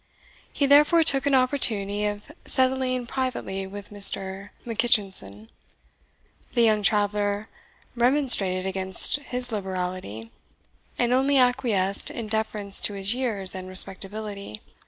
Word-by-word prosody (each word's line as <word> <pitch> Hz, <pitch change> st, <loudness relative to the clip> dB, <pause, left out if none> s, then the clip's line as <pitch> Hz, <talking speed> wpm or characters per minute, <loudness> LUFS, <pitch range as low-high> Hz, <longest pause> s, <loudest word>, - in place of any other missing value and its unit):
He 285 Hz, -, -1 dB
therefore 295 Hz, +4 st, +5 dB
took 275 Hz, -2 st, +3 dB
an 280 Hz, -, +2 dB
opportunity 215 Hz, -6 st, 0 dB
of 205 Hz, +6 st, -5 dB
settling 255 Hz, -1 st, 0 dB
privately 235 Hz, -7 st, -4 dB
with 205 Hz, +1 st, -11 dB
Mr. 195 Hz, -1 st, +2 dB, 0.2 s
Mackitchinson. 195 Hz, -, -1 dB, 1.1 s
The 235 Hz, -, +3 dB
young 215 Hz, -2 st, +2 dB
traveller 205 Hz, 0 st, 0 dB, 0.5 s
remonstrated 240 Hz, -8 st, +3 dB
against 190 Hz, +4 st, 0 dB
his 250 Hz, -3 st, -1 dB
liberality, 180 Hz, -, -5 dB, 0.7 s
and 240 Hz, 0 st, 0 dB
only 270 Hz, +2 st, +2 dB
acquiesced 245 Hz, -7 st, +1 dB
in 225 Hz, -3 st, -6 dB
deference 215 Hz, -2 st, 0 dB
to 205 Hz, -, 0 dB
his 195 Hz, +2 st, +1 dB
years 225 Hz, -7 st, 0 dB
and 185 Hz, -1 st, -8 dB
respectability. 195 Hz, -, -1 dB
210 Hz, 115 wpm, -24 LUFS, 195-250 Hz, 1.1 s, therefore